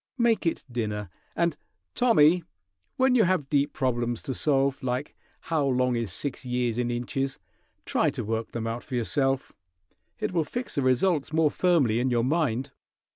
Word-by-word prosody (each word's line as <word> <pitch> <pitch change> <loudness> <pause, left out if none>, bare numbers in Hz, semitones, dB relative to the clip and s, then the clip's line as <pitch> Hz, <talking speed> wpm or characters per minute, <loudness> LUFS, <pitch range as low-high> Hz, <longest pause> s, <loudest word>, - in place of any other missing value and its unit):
Make 230 -6 +2
it 165 - -2
dinner; 105 -5 -3 0.2
and, 170 -3 +1 0.4
Tommy, 180 -9 +4 0.5
when 260 0 +4
you 235 -5 +5
have 170 -7 0
deep 145 0 +2
problems 120 -3 -1
to 135 - -3
solve, 140 -1 +1
like 130 +2 -3 0.3
how 160 -3 0
long 125 -1 +2
is 115 -5 -2
six 135 +9 -3
years 125 -2 -1
in 120 -1 0
inches, 135 +3 -2 0.5
try - - +2
to - - -4
work 115 +1 -2
them 115 -1 -4
out 115 +1 -3
for 130 - -6
yourself. 135 +3 0 0.6
It - - -2
will 165 -2 +2
fix 245 +10 -5
the 140 - 0
results 140 +5 +2
more 155 -2 +3
firmly 145 -11 +2
in 130 +2 +1
your 120 -2 +1
mind." 135 -2 0
135 Hz, 170 wpm, -27 LUFS, 120-160 Hz, 0.6 s, you